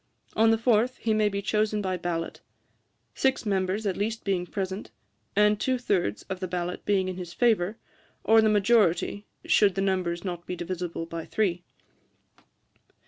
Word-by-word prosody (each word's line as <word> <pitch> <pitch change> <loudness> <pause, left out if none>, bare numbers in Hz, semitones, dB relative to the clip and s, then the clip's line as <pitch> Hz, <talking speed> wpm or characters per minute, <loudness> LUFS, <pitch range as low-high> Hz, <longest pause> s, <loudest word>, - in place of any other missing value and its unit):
On 225 +1 +5
the 225 - +4
fourth 235 +2 +2
he 225 - 0
may 215 -1 +3
be 200 0 -3
chosen 215 0 +1
by 190 -2 -1
ballot; 170 -1 -4 0.7
six 265 -2 0
members 195 +1 0
at 195 -3 0
least 220 +2 -2
being 185 -3 -1
present, 190 +1 -4 0.5
and 210 0 +4
two 260 +2 +1
thirds 185 - -1
of 190 - -6
the 185 - -3
ballot 180 0 -3
being 195 -2 +2
in 185 -1 -4
his 175 -2 -7
favour; 220 -4 +2 0.5
or 225 0 +6
the 220 - +3
majority, 205 -2 +2 0.2
should 200 -3 +4
the - - -2
numbers 185 -3 -1
not 175 -2 -5
be 180 - -3
divisible 175 -1 -4
by 165 -1 -6
three. 180 -5 0
195 Hz, 165 wpm, -27 LUFS, 180-215 Hz, 0.7 s, or